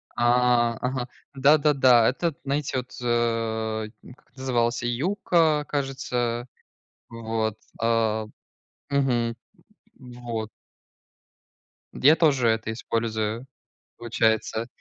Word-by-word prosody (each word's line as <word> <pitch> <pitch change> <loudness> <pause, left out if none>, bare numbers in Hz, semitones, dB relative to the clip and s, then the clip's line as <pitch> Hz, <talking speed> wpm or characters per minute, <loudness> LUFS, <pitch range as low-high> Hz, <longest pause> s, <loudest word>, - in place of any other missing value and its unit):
А, 120 -1 +3
ага. 125 -1 -2 0.3
Да-да-да. 135 -4 +5
Это 170 +7 -1
н 155 - -3
знаете 140 -1 -2
вот, 125 0 -5
э, 115 -2 -1 0.3
как - - -30
это 130 - -18
называлось? 120 -2 0
Yuka, 155 +3 +1
кажется. 125 -4 -2 0.6
Вот, 110 -2 -3 0.2
а 115 -1 +1 0.6
Мгм. 125 -5 +1 0.6
Вот. 120 -4 -6 1.5
Д 130 - +1
я 155 - +8
тоже 140 -8 +3
это 110 0 0
использую, 110 0 -2 0.5
получается. 115 0 0
120 Hz, 95 wpm, -25 LUFS, 115-135 Hz, 1.5 s, я